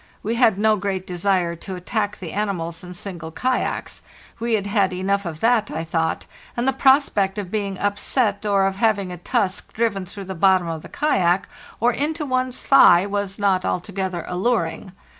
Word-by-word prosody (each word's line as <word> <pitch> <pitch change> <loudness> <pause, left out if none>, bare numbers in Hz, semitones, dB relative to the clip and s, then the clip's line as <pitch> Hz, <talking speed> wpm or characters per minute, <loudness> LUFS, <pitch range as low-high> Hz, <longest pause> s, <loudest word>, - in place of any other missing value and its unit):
We 220 - -1
had 230 -4 +4
no 215 +1 +3
great 190 -1 -3
desire 180 -1 0
to 190 +3 -7
attack 205 +3 -2
the 170 -4 -7
animals 180 -5 -3
in 180 0 -9
single 175 -3 -6
kayaks; 255 +9 -2 0.4
we 235 0 -1
had 200 -2 -2
had 200 -2 +1
enough 195 +1 -1
of 160 -2 -7
that, 225 -2 +3
I 160 +1 -3
thought, 165 0 -1 0.3
and 240 +2 0
the 270 - +3
prospect 265 -8 +3
of 195 -3 -5
being 200 -3 -2
upset 205 +2 0
or 200 -2 +2
of 195 0 -1
having 205 -4 +1
a 180 - -6
tusk 190 +1 -2
driven 205 -5 -1
through 200 +1 -8
the 190 - -5
bottom 185 0 +3
of 160 -1 -4
the - - -12
kayak 185 - +1 0.3
or 235 +2 +3
into 300 +3 -2
one's 255 -1 -1
thigh 185 -9 +7
was 200 -1 -3
not 195 -3 +2
altogether 185 -1 -3
alluring. 185 -1 -1
195 Hz, 180 wpm, -22 LUFS, 180-220 Hz, 0.4 s, thigh